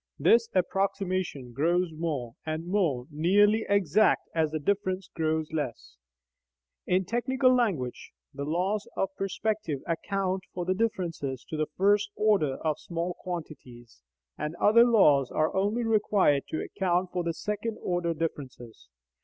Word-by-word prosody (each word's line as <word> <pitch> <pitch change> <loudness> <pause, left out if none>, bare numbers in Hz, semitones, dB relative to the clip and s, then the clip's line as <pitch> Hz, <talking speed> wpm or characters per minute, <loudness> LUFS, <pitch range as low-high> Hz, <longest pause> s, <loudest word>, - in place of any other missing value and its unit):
This 230 0 +4
approximation 185 -7 -1
grows 170 +6 +1
more 150 -8 -3
and 155 +1 -4
more 170 -10 0
nearly 205 +8 +3
exact 200 +1 +3
as 160 -2 +1
the 155 - -2
difference 190 +2 -1
grows 160 -1 -1
less; 145 - -4 0.9
in 185 +1 +2
technical 255 +4 +2
language, 180 - -1 0.2
the 140 0 -5
laws 185 +7 -1
of 195 0 -1
perspective 195 -6 -2
account 190 +2 -1
for 175 -1 -3
the 185 - +1
differences 170 - -2
to - - -4
the 155 0 -1
first 205 +2 +3
order 200 -11 +2
of 155 -1 0
small 170 +1 -3
quantities, 125 - -8 0.4
and 150 +2 -3
other 230 +5 +5
laws 150 - +4
are 155 0 0
only 205 +5 +1
required 205 -10 +2
to 155 - -3
account 180 -2 -1
for 175 -2 -1
second 210 +5 -4
order 175 -2 -1
differences. 130 - -6
180 Hz, 135 wpm, -28 LUFS, 155-200 Hz, 0.9 s, other